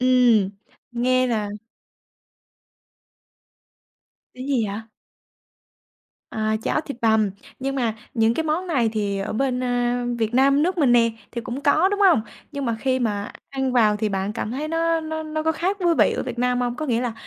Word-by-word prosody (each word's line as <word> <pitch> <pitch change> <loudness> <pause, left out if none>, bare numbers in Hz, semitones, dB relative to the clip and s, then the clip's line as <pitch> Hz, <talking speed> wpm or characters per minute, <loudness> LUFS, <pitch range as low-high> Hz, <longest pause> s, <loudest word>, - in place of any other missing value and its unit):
Ừm. 245 -6 +4 0.4
Nghe 255 +1 +2
là 220 -4 -1 2.9
Cái 255 - -8
gì 255 -6 +1
vậy? 200 +2 -4 1.5
À, 215 0 -1
cháo 305 - 0
thịt 280 -5 -7
bằm, 220 -2 +3 0.3
nhưng 270 +1 -2
mà 235 -5 0 0.2
những 225 -1 +3
cái 320 - -1
món 320 +4 -1
này 250 -9 +2
thì 200 -2 -1
ở 195 - -3
bên, 255 +2 0
a, 245 0 0
Việt 225 0 -1
Nam 275 +3 +4
nước 365 +2 0
mình 280 -7 +4
nè, 235 -1 +5 0.2
thì 235 - -4
cũng 245 +4 -5
có, 290 +6 +4
đúng 410 0 -2
hông? 375 - +5 0.3
Nhưng 280 -2 -4
mà 230 -2 0
khi 260 +1 0
mà 210 -4 -2 0.2
ăn 265 -1 -1
vào 220 -4 +4
thì 215 0 -1
bạn 195 +1 -2
cảm 220 -1 -3
thấy 285 +5 -3
nó 330 +1 +1
nó 315 0 -4
nó 310 0 -3
có 320 - +2
khác 365 +5 -1
với 345 -2 +2
vị - - +4
ở - - -2
Việt 245 -2 -5
Nam 250 0 +1
hông? 245 -1 -1
Có 310 - -4
nghĩa 240 -4 0
là 245 -2 -2
250 Hz, 190 wpm, -23 LUFS, 225-295 Hz, 2.9 s, nè